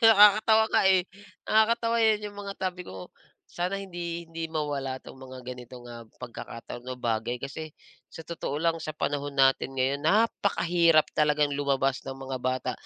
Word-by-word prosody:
Nakakatawa 220 0 +7
nga, - - +4
eh, 190 -1 +5 0.4
nakakatawa 230 +1 +3
'yan 215 -2 +2
yung 205 - -16
mga 200 -1 -5
sabi 180 -1 -4
ko, 95 -1 -9 0.4
"Sana 180 +3 -2
hindi, 170 -2 -5
hindi 165 0 -4
mawala 145 -4 -3
'tong 130 - -12
mga 130 -1 -10
ganitong, 125 0 -9
ah, 115 -1 -9 0.2
pagkakataon 120 0 -8
o 130 - -4
bagay," 120 0 -2
kasi 155 +2 -6 0.3
sa 165 - -10
totoo 165 -4 -5
lang, 165 -1 +2
sa 155 -1 -5
panahon 145 -1 -2
natin 135 0 +3
ngayon, 135 +3 0
napakahirap 175 -5 +3
talagang 150 -1 +3
lumabas 135 -1 +1
ng 135 - -4
mga 135 -1 -5
bata. 130 0 -1
150 Hz, 160 wpm, -27 LUFS, 130-185 Hz, 0.4 s, Nakakatawa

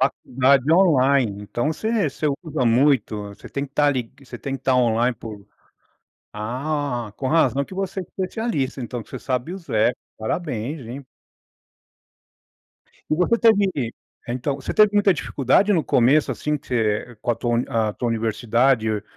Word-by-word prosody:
Faculdade 135 +1 +2
online. 135 - +3
Então 120 +7 -2
você 220 0 0
você 155 - -3 0.2
usa 155 -6 -2
muito, 120 -2 +3 0.2
você - - -13
tem 140 0 -3
que 135 - -26
tá 145 0 +3
lig 125 -3 -3
você 125 -1 -9
tem 135 +2 -4
que 130 - -19
tá 130 -1 +2
online 120 0 +2
por 105 -4 -10 0.9
Ah! 125 +1 -3
Com 135 - -2
razão 140 -4 +2
que 185 - -11
você 195 0 -3
é - - -4
especialista, 185 - -3
então, 120 0 -5
que - - -22
você - - -6
sabe 130 +4 -3
os 185 -3 -9
app, 110 +3 +2 0.2
parabéns, 140 +2 -3
hein? 135 +4 -7 2.1
E - - +4
você 180 +8 +2
teve 210 -4 +4
que 120 -7 -3 0.4
então, 125 +3 -2
você 135 -1 -5
teve 215 -1 +5
muita 205 -2 +5
dificuldade 150 - +2
no 170 -5 +2
começo, 135 +5 +3
assim, 150 0 -1
que 145 - -16
você 115 0 -1
com 120 - -1
a - - -3
tua 120 +1 0 0.3
a 105 - -3
tua 120 - -3
universidade? 115 +2 +1
Ou 105 -2 -2
135 Hz, 170 wpm, -22 LUFS, 120-155 Hz, 2.1 s, teve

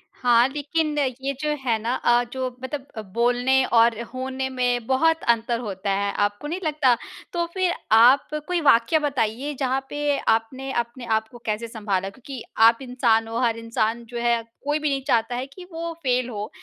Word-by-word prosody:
हाँ, 240 -1 +4
लेकिन, 295 +2 -1
ये 265 0 -1
जो 300 - -1 0.2
है 230 -2 +2
ना 235 +3 -1
अ, 240 0 +3
जो 260 -1 -2 0.2
मतलब 260 -5 -6
बोलने 245 +3 +3
और 230 -1 +4
होने 265 +1 -3
में 245 -2 0
बहुत 325 +5 +2
अंतर 235 0 +2
होता 200 -3 -3
है। 200 +1 0
आपको 205 +8 -4
नहीं 345 +5 -3
लगता? 295 -5 +3 0.4
तो 345 -1 0
फिर 370 -2 +1 0.2
आप 240 +5 +6 0.2
कोई 360 -1 0
वाक़या 275 +2 +4
बताइए, 275 -1 -1
जहाँ 265 0 0
पे 290 -1 0
आपने 255 +4 -1
अपने 235 +1 -5
आप 220 0 -1
को 240 - -11
कैसे 215 +2 -2
सँभाला? 205 -4 -2
क्योंकि 255 +3 -9 0.3
आप 230 0 +4
इंसान 240 -3 +1
हो, 225 +1 -4
हर 235 -2 +1
इंसान 230 0 -1
जो 240 - -6
है, 235 -1 +2 0.2
कोई 295 +1 +1
भी 300 -1 0
नहीं 275 -1 -1
चाहता 235 -2 +1
है 250 +2 -3
कि 360 +6 -12
वो 335 +1 -4
फ़ेल 250 -1 +1
हो 210 -2 -5
245 Hz, 185 wpm, -24 LUFS, 230-275 Hz, 0.4 s, आप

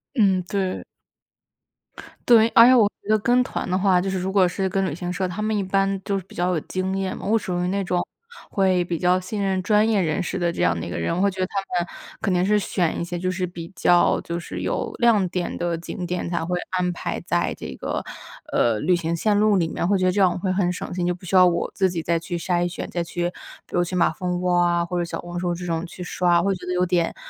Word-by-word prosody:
嗯， 195 -6 +3
对。 190 0 -2 1.4
对， 230 -2 +6
而 230 - +8
且 255 - +7
我 225 -5 +5
觉 - - -14
得 215 0 +4
跟 245 +4 +3
团 250 - -4
的 185 - +2
话， 190 -2 +3
就 190 - -2
是 190 - -2
如 185 +1 -2
果 190 -2 +5
是 190 +2 -1
跟 195 +1 0
旅 145 - -3
行 175 +2 -4
社， 185 +1 -1
他 185 +4 -4
们 215 0 0
一 205 - 0
般 195 0 0
就 200 -1 -1
是 190 - -8
比 - - -16
较 180 +1 0
有 160 - 0
经 185 +4 -3
验 190 -1 -2
嘛。 - - -7
我 220 +3 +3
属 180 -4 -3
于 - - 0
那 200 +2 0
种 175 -1 -1 0.4
会 185 -3 +2
比 170 -1 -3
较 180 +1 +3
信 190 +3 -4
任 190 -1 0
专 210 +2 +3
业 215 -3 +2
人 160 0 0
士 185 - -3
的 175 -2 0
这 - - -3
样 85 - +2
的 80 - -5
一 - - -6
个 - - -4
人， 85 - -1
我 - - -1
会 200 +1 +3
觉 190 0 -7
得 185 - +1
他 195 +1 -2 0.2
们 - - -16 0.3
肯 195 - +1
定 180 0 +2
是 210 +1 +3
选 180 -4 -1
一 - - -1
些 175 0 -4
就 185 +1 -1
是 185 0 -2
比 170 -1 -8
较 175 -1 +3
就 170 0 -4
是 175 - -6
有 - - -2
亮 220 -6 +4
点 180 0 -3
的 170 -1 -1
景 175 +2 -6
点 175 0 -3
才 170 -2 -1
会 180 +2 -1
安 180 -1 0
排 175 - -4
在 - - 0
这 65 - -7
个， - - -3 0.5
呃， 115 -2 +2
旅 180 - +2
行 170 -1 -1
线 205 +5 +1
路 210 -1 +4
里 175 -3 +2
面， 170 - -2
会 200 +1 +2
觉 185 - +1
得 185 - +3
这 200 - 0
样 185 -2 +5
我 - - -4
会 185 0 -1
很 185 -2 +1
省 180 - -6
心， 175 -1 -1
就 180 - +1
不 180 - -15
需 180 - -4
要 185 0 +8
我 170 -1 0
自 190 -1 +2
己 170 -2 -3
再 170 +1 +1
去 170 +1 -4
筛 175 0 0
选， 175 - -6
再 175 - -2
去 175 +1 -2 0.4
比 - - -16
如 175 - +3
去 180 +1 -4
马 175 - +3
蜂 180 +2 -3
窝 180 0 +1
啊 175 -1 +2
或 180 0 -3
者 175 - 0
小 170 - -5
红 175 0 -6
书 175 -1 -1
这 180 +1 -6
种 165 -1 -2
去 180 +1 -10
刷。 175 -1 +2
会 195 +2 +1
觉 180 -1 -9
得 180 - -2
有 180 0 +1
点， 175 -1 0
180 Hz, 300 characters per minute, -23 LUFS, 175-195 Hz, 1.4 s, 而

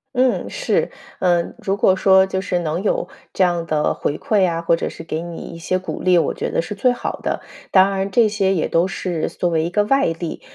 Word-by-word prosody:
嗯， 255 0 +1
是。 - - 0 0.3
呃， 175 -2 +1
如 195 +1 -1
果 190 -2 +4
说 190 0 +5
就 190 0 -2
是 185 -1 -1
能 170 +1 -2
有 210 - 0 0.2
这 190 - +1
样 170 -2 0
的 150 -1 +1
回 145 - -2
馈 200 -4 +2
啊， 165 -1 -1
或 165 0 +3
者 165 - -3
是 - - -10
给 160 0 -4
你 170 -1 -7 0.2
一 165 - -9
些 185 +2 -1
鼓 185 - -6
励， 180 -1 +4
我 165 - +1
觉 - - -3
得 - - 0
是 210 - -5
最 250 +5 +2
好 245 - -4
的。 - - -2 0.3
当 190 0 +5
然 195 0 -1
这 225 +3 +4
些 195 -2 +1
也 160 - 0
都 170 +3 +2
是 180 -4 -3
作 175 - -2
为 160 -1 +1
一 - - -2
个 205 +4 +2
外 275 +6 +2
力， 165 0 -4
185 Hz, 255 characters per minute, -20 LUFS, 170-195 Hz, 0.3 s, 说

